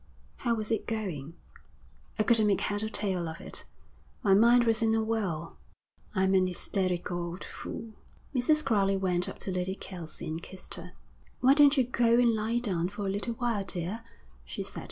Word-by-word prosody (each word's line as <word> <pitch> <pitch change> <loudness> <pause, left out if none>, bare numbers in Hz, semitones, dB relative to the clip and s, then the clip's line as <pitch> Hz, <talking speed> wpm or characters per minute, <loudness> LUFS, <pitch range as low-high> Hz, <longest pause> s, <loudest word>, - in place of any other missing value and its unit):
'How 235 -2 0
was 215 0 -3
it 225 - -1
going?' 175 -9 -4 0.8
'I 215 - +3
couldn't 220 -2 +4
make 200 -2 +2
head 205 0 0
or 220 - -2
tail 190 -6 0
of 160 - -8
it. - - -6 0.6
My 195 - +5
mind 235 +4 +6
was 225 0 +2
in 225 -1 +3
a 220 - +1
whirl. 190 -8 -2 0.6
I'm 190 0 +3
an 185 -1 +4
hysterical 180 -1 0
old 170 +2 -6
fool.' 225 -1 -7 0.4
Mrs. 305 +4 +3
Crowley 195 -3 +2
went 180 -1 0
up - - -8
to 190 - -4
Lady 185 +1 -2
Kelsey 175 -6 -8
and 160 +1 -4
kissed 185 +1 -10
her. - - -7 0.5
'Why 260 +2 +7
don't 290 0 +6
you 260 - +5
go 235 -1 +3
and 240 -1 +4
lie 220 +2 0
down 185 -7 0
for 205 +1 -5
a 195 - 0
little 205 +4 -2
while, 230 -4 -1
dear,' 185 +4 -3 0.4
she - - -5
said. - - -6
205 Hz, 190 wpm, -29 LUFS, 185-230 Hz, 0.8 s, Why